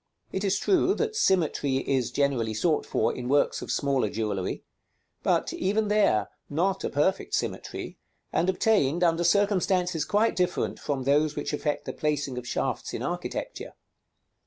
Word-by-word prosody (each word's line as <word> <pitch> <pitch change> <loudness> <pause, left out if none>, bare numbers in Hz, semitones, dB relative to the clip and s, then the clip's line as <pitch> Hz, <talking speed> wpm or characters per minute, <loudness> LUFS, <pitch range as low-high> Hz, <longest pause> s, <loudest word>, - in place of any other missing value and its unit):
It 190 - -2
is 195 -1 +2
true 380 0 +2
that 450 -1 -1
symmetry 160 - +2
is 130 -4 +1
generally 125 -6 0
sought 155 +7 +1
for 115 - +1
in 125 0 -5
works 145 +1 +2
of - - -7
smaller 135 -6 +1
jewellery; 105 -3 -3 0.6
but, - - +1
even 210 +3 0
there, 200 - +3 0.2
not 185 +6 0
a - - -1
perfect 150 +7 0
symmetry, - - -4 0.3
and 175 - +2
obtained 180 -5 +2
under 170 0 +3
circumstances 185 -3 +2
quite 215 +6 +2
different 180 -1 -1
from 140 -3 -2
those 145 +3 +2
which - - -3
affect 150 0 -2
the - - -4
placing 145 -4 -1
of 125 - -10
shafts - - -2
in - - -4
architecture. - - -4
155 Hz, 155 wpm, -27 LUFS, 135-190 Hz, 0.6 s, there